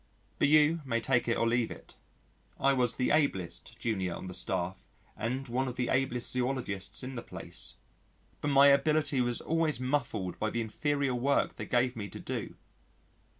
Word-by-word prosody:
But - - +4
you 155 +2 +5
may 115 -4 0
take 120 +2 +1
it 115 - +2
or 115 - +2
leave 115 0 +2
it: - - -11 0.7
I 135 0 +4
was 125 -3 +1
the 125 - +1
ablest 95 - 0
junior 95 -6 -1
on - - -7
the 90 - -6
staff 90 +1 -3 0.3
and 125 +5 -3
one 130 +3 0
of 125 - -4
the 125 -2 -1
ablest 125 -2 +1
zoologists 125 -7 -2
in 130 +1 -5
the 120 - -4
place - - -6 0.7
but - - -2
my 140 0 +7
ability 145 -1 +3
was 120 -1 0
always 160 -4 +1
muffled 125 -9 -1
by 110 - 0
the 115 - -2
inferior 140 +4 0
work 135 +3 +1
they - - -6
gave 125 0 +2
me 100 -3 -5
to - - -8
do. - - -5
125 Hz, 180 wpm, -31 LUFS, 115-140 Hz, 0.7 s, my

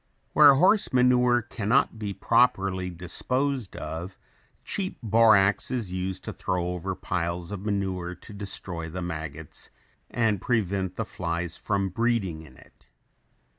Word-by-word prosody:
Where 145 -2 +8
horse 190 +8 +4
manure 125 -1 +4
can 110 -2 -5
not 115 -1 +3
be 105 -2 -3
properly 100 -3 +2
disposed 125 +8 -2
of, 80 +5 -6 0.5
cheap 195 -1 -3
borax 110 -3 +4
is 115 -8 -3
used 95 0 -3
to - - -5
throw 90 -1 -2
over 90 +2 -3
piles 85 -1 -3
of 100 -1 -5
manure 95 -3 -2
to 90 - -13
destroy 95 -4 -5
the 90 +2 -5
maggots 80 -3 -7 0.4
and 110 -5 0
prevent 100 -5 0
the 115 - -2
flies 85 -2 -3
from 100 -1 -1
breeding 105 -6 0
in 70 -5 -15
it. - - -21
95 Hz, 135 wpm, -26 LUFS, 90-115 Hz, 0.5 s, Where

